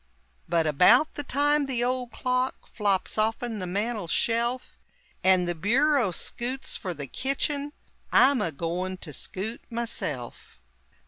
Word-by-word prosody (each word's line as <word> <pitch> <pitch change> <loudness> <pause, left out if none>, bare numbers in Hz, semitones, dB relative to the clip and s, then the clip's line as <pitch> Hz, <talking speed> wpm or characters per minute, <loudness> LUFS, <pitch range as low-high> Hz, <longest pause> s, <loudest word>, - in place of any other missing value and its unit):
But 165 -1 +2
about 180 - +5
the - - -4
time 290 +1 +2
the 245 -3 0
old 250 0 -1
clock 255 +1 -1
Flops 205 -1 0
off'n 225 +1 -1
the 185 - -4
mantel 205 +1 -2
shelf, 235 +7 0 0.4
And 185 -1 +4
the 175 - 0
bureau 240 - +2
skoots 250 +8 -4
fer 185 - -4
the 140 -1 -6
kitchen, 280 - -2 0.4
I'm 270 0 +5
a 165 - -1
goin' 175 +5 -3
to 160 -5 -10
skoot, 210 - -3
myself! 190 - -4
230 Hz, 135 wpm, -27 LUFS, 180-255 Hz, 0.4 s, about